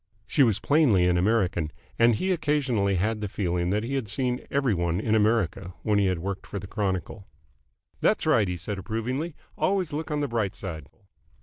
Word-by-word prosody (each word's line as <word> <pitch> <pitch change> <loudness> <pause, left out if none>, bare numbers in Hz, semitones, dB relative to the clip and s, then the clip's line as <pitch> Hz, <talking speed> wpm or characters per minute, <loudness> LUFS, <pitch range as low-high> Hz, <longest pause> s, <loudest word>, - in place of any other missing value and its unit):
She 145 - +1
was 115 -5 +4
plainly 125 - +4
an 90 - +3
American, 90 -4 +1 0.3
and 115 0 +5
he 190 - -1
occasionally 135 - +1
had 105 +4 0
the 105 - -2
feeling 90 -3 -1
that 105 +3 0
he 125 +4 -4
had 135 -5 -1
seen 125 +4 -1
every 135 -5 +1
one 85 -1 0
in 110 +1 0
America 105 -4 +1
when 105 -1 +2
he 100 - +3
had 90 -1 +1
worked 95 +3 -5
for - - -5
the 100 - -6
Chronicle. 100 0 -3 0.7
"That's - - +2
right," 105 - +4
he 90 0 -2
said 95 +4 -4
approvingly. 125 - -3 0.2
"Always 185 -5 +1
look 160 +3 -3
on 150 -1 -1
the 145 - 0
bright 110 -5 -1
side." 80 -7 -6
105 Hz, 195 wpm, -26 LUFS, 95-130 Hz, 0.7 s, and